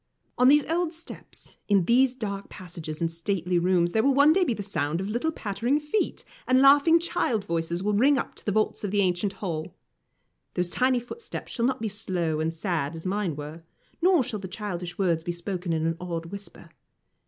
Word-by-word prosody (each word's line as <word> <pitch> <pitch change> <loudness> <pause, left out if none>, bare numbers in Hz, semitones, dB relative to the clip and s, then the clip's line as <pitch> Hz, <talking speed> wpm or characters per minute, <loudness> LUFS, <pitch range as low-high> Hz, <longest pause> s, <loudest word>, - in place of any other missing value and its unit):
On 250 - +4
these 290 +1 +6
old 335 0 0
steps, 325 +1 -11
in 195 -4 +3
these 255 +4 +4
dark 200 -4 -5
passages 170 -3 -7
and 165 -1 0
stately 175 +1 -1
rooms, 175 -1 +2
there 220 - +2
will 275 +2 +3
one 285 +3 +6
day 375 +2 +3
be 250 -10 0
the 205 - -5
sound 165 -4 -1
of 190 - -3
little 240 +9 -1
pattering 240 +3 -1
feet, 300 +8 -2 0.2
and 255 0 +4
laughing 290 +5 +6
child 235 - -1
voices 170 +1 -2
will 210 +1 +1
ring 270 +7 +4
up - - -3
to - - -9
the - - +2
vaults 215 +1 0
of 205 - -1
the 205 +1 +2
ancient 190 +1 +1
hall. 170 -6 -5 0.8
Those 180 0 0
tiny 255 +5 +2
footsteps 245 - -7
shall 235 - 0
not 260 -3 0
be 225 - -1
slow 180 -6 -2
and 160 +1 0
sad 165 -3 -2
as 165 - -6
mine 190 -4 -1
were, 150 +3 -8 0.4
nor 355 -5 +4
shall 215 -3 -4
the 190 - -6
childish 180 -3 -5
words 170 -4 +1
be 175 - -2
spoken 175 0 -4
in 160 -1 0
an 165 0 0
awed 170 -2 -4
whisper. 200 +4 -9
200 Hz, 205 wpm, -26 LUFS, 170-250 Hz, 0.8 s, these